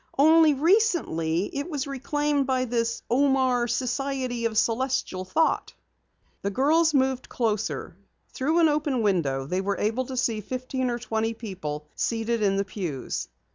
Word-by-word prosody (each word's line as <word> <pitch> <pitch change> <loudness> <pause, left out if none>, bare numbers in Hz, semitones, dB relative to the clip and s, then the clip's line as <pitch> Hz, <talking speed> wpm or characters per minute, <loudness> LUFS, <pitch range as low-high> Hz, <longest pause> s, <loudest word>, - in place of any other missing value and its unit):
Only 315 +1 +6
recently 285 - +1
it 285 +4 -3
was 290 -3 -2
reclaimed 285 +1 -1
by 255 -1 +1
this 230 -1 -1
Omar 260 -2 +2
Society 255 0 -2
of 220 -1 -1
Celestial 230 -5 0
Thought." 320 - 0 0.7
The 200 - -1
girls 310 +9 +3
moved 265 -1 +1
closer. 210 - -2 0.4
Through 315 +6 +1
an 325 - +6
open 295 -5 0
window 145 -10 +1
they 180 +6 -1
were 200 +1 -1
able 225 +5 0
to 260 - -5
see 230 -4 0
fifteen 255 +3 -3
or 240 - -1
twenty 225 -1 -2
people 165 -10 -6
seated 230 0 -1
in 195 -2 +2
the 200 - 0
pews. 175 - -4
245 Hz, 145 wpm, -26 LUFS, 210-275 Hz, 0.7 s, Only